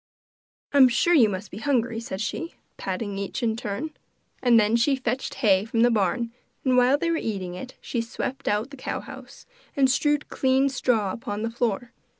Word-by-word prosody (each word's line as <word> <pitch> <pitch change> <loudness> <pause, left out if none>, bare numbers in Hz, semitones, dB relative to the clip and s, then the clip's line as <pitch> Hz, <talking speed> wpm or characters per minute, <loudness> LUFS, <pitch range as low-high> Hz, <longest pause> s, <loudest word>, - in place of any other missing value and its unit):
'I'm 275 -2 +8
sure 245 +9 +2
you 245 -10 +6
must 195 +1 -5
be 200 - -7
hungry,' 240 -3 0
said 205 -4 -5
she, 330 +9 -4 0.2
patting 195 +1 -4
each 200 +6 -4
in 225 -1 +1
turn. 230 +7 -4 0.5
And 240 -2 +5
then 215 +1 +3
she 255 +4 +3
fetched 255 0 -3
hay 195 -6 +3
from 225 +1 -1
the 240 +1 +5
barn, 225 +2 0 0.3
and 255 -1 +3
while 250 +3 +5
they 335 +2 0
were 330 - +1
eating 190 - -3
it, 255 +8 -8
she 235 - -2
swept 255 +3 -5
out 215 +6 0
the 280 - -10
cow - - -4
house, - - -12 0.3
and 265 -2 +4
strewed 295 +1 +1
clean 265 +1 +2
straw 230 -7 +1
upon 205 0 -5
the 230 - -2
floor. 240 0 -2
235 Hz, 190 wpm, -25 LUFS, 210-265 Hz, 0.5 s, I'm